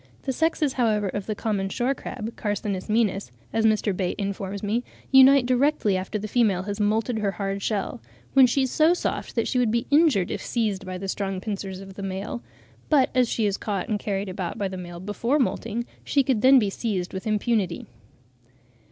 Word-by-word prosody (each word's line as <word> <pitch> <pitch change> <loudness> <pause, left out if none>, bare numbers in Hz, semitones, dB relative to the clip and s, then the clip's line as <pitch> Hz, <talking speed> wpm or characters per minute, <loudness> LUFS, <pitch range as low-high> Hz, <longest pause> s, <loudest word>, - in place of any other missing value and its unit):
') - - -29
The 265 - -1
sexes, 310 -1 +1
however, 215 -5 +1
of 200 +1 -4
the 215 - -2
common 200 -3 -1
shore 245 +7 0
crab 230 -3 -6
(Carcinus 205 -2 -3
maenas), 210 - +1 0.2
as 220 0 +3
Mr. 215 -2 +1
Bate 180 -1 -2
informs 200 0 -4
me, 220 +4 0 0.3
unite 265 0 +7
directly 255 -5 +2
after 185 +3 -2
the 210 +1 -5
female 210 -5 +2
has 205 +1 -4
moulted 220 +2 +1
her 200 -2 0
hard 195 0 -3
shell, 195 - -2 0.3
when 265 -2 +7
she 265 +3 +1
is 260 - -1
so 320 +3 +4
soft - - -3
that 230 - +1
she 250 - +1
would 245 -3 +2
be 235 +2 0
injured 285 - +4
if - - -3
seized 210 -5 -1
by 185 0 -4
the 195 +1 -5
strong 195 -1 -2
pincers 195 -2 -5
of 195 0 -10
the 200 - -8
male; 195 +4 -4 0.5
but 280 -4 +4
as 250 -2 +3
she 225 - 0
is 200 -1 0
caught 200 -4 -3
and 210 -2 0
carried 200 -1 -2
about 180 -2 -4
by 200 - -1
the 190 - -6
male 175 -1 -7
before 210 +8 0
moulting, 235 -3 -1 0.2
she 280 - +2
could 255 -5 +1
then 265 +2 +7
be 210 -5 +2
seized 195 -5 -3
with 190 +3 -5
impunity. 210 -4 0
210 Hz, 205 wpm, -25 LUFS, 195-245 Hz, 0.5 s, unite